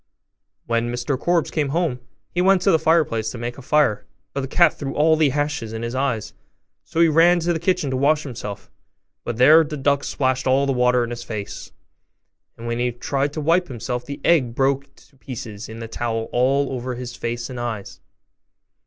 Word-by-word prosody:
When 115 0 0
Mr 120 +3 -1
Korbes 170 +5 0
came 150 -3 0
home, 160 -4 0 0.3
he 175 - 0
went 190 0 +4
to 195 - +4
the 160 - +4
fireplace 155 -9 +2
to 120 - -7
make 120 +2 -5
a - - -9
fire; 135 -6 +2 0.3
but 140 - -2
the 135 - -4
cat 170 +3 +4
threw 140 -2 -5
all 160 +2 +4
the 155 -3 +3
ashes 145 -6 -2
in 110 +1 -5
his 115 +1 -3
eyes: 130 -5 -1 0.5
so 160 +12 -1
he 170 - +7
ran 165 +3 +5
to 175 +1 +1
the 165 - -2
kitchen 175 -4 0
to - - -1
wash 150 +3 +2
himself; 115 -6 -7 0.5
but 120 - -4
there 155 +6 +7
the 150 -1 -5
duck 140 +1 +1
splashed 130 -2 -1
all 135 +2 +3
the 140 - +1
water 125 -1 +3
in 120 - -4
his 120 0 -5
face; 105 -4 -6 0.9
and 115 - -9
when 115 0 -2
he 125 0 +1
tried 135 +4 -2
to 155 - -3
wipe 170 +4 +2
himself, 125 0 -4
the 140 +3 -7
egg 130 -9 +3
broke 135 +1 0
to 135 - -23
pieces 120 -5 -8
in 110 - -8
the 115 0 -6
towel 115 -1 -3
all 135 +3 +2
over 125 -1 -4
his 120 0 -7
face 120 0 -4
and 125 -2 -7
eyes. 115 -4 -5
130 Hz, 205 wpm, -22 LUFS, 120-150 Hz, 0.9 s, he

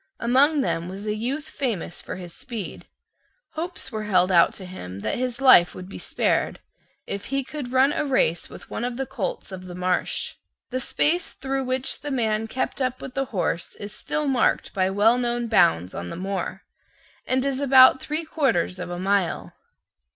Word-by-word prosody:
Among 275 +5 +4
them 170 -9 -1
was 195 +3 -7
a 210 - 0
youth 265 +8 -3
famous 230 - -3
for - - -6
his 175 -2 -8
speed. 235 -7 -7 0.6
Hopes 325 -4 -5
were 215 -2 -4
held 185 -2 +3
out 170 -2 +6
to 190 - -6
him 95 - -8
that - - -1
his 250 0 -2
life 255 -10 +7
would 185 - -8
be 195 - -8
spared - - 0 0.5
If 200 - -5
he 275 0 -1
could 275 -2 -6
run 265 +3 +4
a - - 0
race 260 - +1
with - - -11
one - - -3
of 245 0 -2
the 270 - -1
colts 255 -7 -4
of 185 -1 -8
the 180 - -8
marsh. 180 0 -1 0.4
The 255 - -1
space 325 +6 +1
through 270 0 -2
which 255 +1 -1
the 290 - -4
man 225 -4 0
kept 260 +3 -3
up 255 -1 -1
with 255 - -8
the 270 0 -1
horse 180 -6 -2
is 205 +1 -7
still 305 +7 -2
marked 265 -4 +1
by 190 -2 +1
well 215 +5 +4
known 240 -1 0
bounds 90 - +3
on 90 - -5
the - - -6
moor, 190 +1 -4 0.6
and 260 +1 +1
is 275 -1 0
about 265 -1 +7
three 310 +4 -3
quarters 230 - 0
of 180 0 -5
a 175 - -4
mile. 190 -1 0
235 Hz, 190 wpm, -24 LUFS, 185-265 Hz, 0.6 s, life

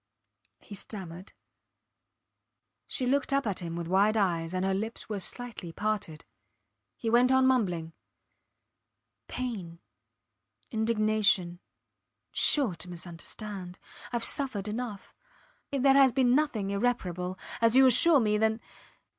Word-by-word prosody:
He - - -12
stammered. 190 -2 -7 1.6
She 255 - -2
looked 275 +3 +1
up 275 -1 +1
at 205 -4 -2
him 170 -1 -5
with 170 -1 -4
wide 200 +4 +3
eyes, 170 -5 0
and 185 0 -1
her 195 - +1
lips 220 +4 -4
were 210 -2 -4
slightly 220 -4 -3
parted. 205 -5 -3 0.7
He 230 - -6
went 245 +2 +4
on 260 0 +4
mumbling... 180 -11 0 1.3
Pain.... 205 -10 -5 0.9
Indignation.... 215 -5 +1 0.7
Sure 270 -10 +3
to 180 - -8
misunderstand. 180 +2 -8 0.3
Ive 240 -1 -2
suffered 225 -8 +1
enough. 215 -2 -5 0.6
And 280 - -1
if - - -2
there 270 -1 +6
has 265 -2 +6
been 250 -1 +3
nothing 240 -9 0
irreparable 185 -5 -2 0.2
as 230 +1 +4
you 265 0 +7
assure 295 +4 +6
me... 210 -3 +1
then 220 +1 +1
215 Hz, 125 wpm, -29 LUFS, 180-245 Hz, 1.6 s, you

